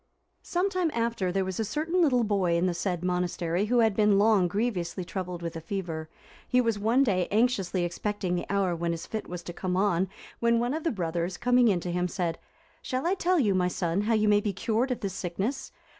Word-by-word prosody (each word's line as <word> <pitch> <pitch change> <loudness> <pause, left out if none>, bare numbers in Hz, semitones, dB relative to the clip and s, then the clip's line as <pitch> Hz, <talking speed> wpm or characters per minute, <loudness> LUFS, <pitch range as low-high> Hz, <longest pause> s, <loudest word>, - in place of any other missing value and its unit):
Some 365 +3 -1
time 365 -3 +1
after, 230 -5 0
there 190 +1 0
was 190 +1 -4
a - - +2
certain 315 - 0
little 255 -7 +3
boy 195 -5 +1
in 170 - +1
the 180 - +1
said 175 0 -2
monastery, 180 0 0
who 240 +2 +3
had 220 -3 +3
been 210 -1 +4
long 205 -3 +4
grievously 185 -3 -2
troubled 180 -1 -5
with 170 -1 -4
a 165 - -5
fever; 165 -3 -4 0.4
he 250 - +3
was 230 -4 +1
one 230 +6 +3
day 185 -8 +1
anxiously 205 -5 +1
expecting 190 +1 -2
the 175 - -2
hour 195 -3 +1
when 170 0 -1
his 165 - -6
fit 220 - -5
was 175 0 -6
to 175 - -7
come 180 +1 -2
on, 190 -2 +2 0.3
when 235 0 +3
one 240 +3 0
of 315 +1 -3
the 330 - +1
brothers, 175 - -2
coming 245 0 +4
in 195 -5 +3
to 175 - -3
him, 180 +1 0
said, 170 -2 -2 0.4
"Shall 255 +3 -3
I 355 - +3
tell 365 -1 +1
you, 210 -8 +3
my 180 -1 +2
son, 175 +1 -1
how 225 +2 +1
you 215 0 +2
may 205 0 +4
be 205 -1 -2
cured 225 +6 0
of 250 - -2
this 195 -2 -3
sickness? 195 +9 -3
195 Hz, 230 wpm, -28 LUFS, 180-235 Hz, 0.4 s, been